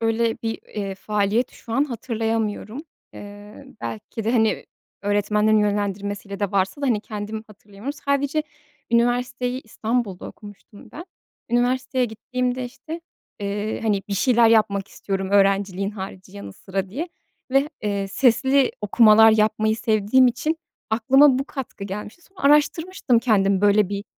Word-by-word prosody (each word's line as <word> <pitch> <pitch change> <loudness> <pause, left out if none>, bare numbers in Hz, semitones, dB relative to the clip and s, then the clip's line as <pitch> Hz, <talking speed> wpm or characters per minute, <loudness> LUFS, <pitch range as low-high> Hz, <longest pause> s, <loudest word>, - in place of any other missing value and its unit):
öyle 225 0 +1
bir, 225 -1 -2
eee, 200 -2 -5
faaliyet 210 +4 0
şu 225 - -11
an 275 +5 +3
hatırlayamıyorum. 225 -1 -3 0.3
Eee, 205 +4 -11 0.2
belki 220 0 -6
de, 230 - +1
hani, 220 -3 +1 0.4
öğretmenlerin 210 +1 +2
yönlendirmesiyle 205 -1 -2
de 200 -2 0
varsa 195 +6 0
da, 280 - 0
hani, 225 -5 +2
kendim 215 +1 -6
hatırlayamıyorum. 210 +4 -8
Sadece 280 +2 +1 0.5
üniversiteyi 245 +2 +1
İstanbul'da 220 -3 -3
okumuştum 205 -1 -13
ben. 335 - -8 0.5
Üniversiteye 255 +2 +1
gittiğimde, 250 +3 -3
işte, 315 +7 -8 0.4
eee, 205 +2 -3
hani, 205 -3 +1
bir 200 - -1
şeyler 235 +2 +4
yapmak 200 -3 +2
istiyorum 195 -1 -4
öğrenciliğin 195 -1 +2
harici, 190 -2 -9
yanı 100 -1 -8
sıra 190 - -4
diye 290 - -4 0.4
ve, 275 +2 +3
eee, 200 -2 -2
sesli 265 +4 +3
okumalar 220 +1 +6
yapmayı 215 0 +2
sevdiğim 220 +3 +3
için 305 +6 0 0.3
aklıma 260 +5 +5
bu 270 - -2
katkı 265 -8 -7
gelmişti. 210 - -7
Sonra 385 - -18
araştırmıştım 295 -1 +3
kendim, 200 -5 +2
böyle 205 -1 +4
bir 200 0 -4
220 Hz, 135 wpm, -23 LUFS, 205-250 Hz, 0.5 s, okumalar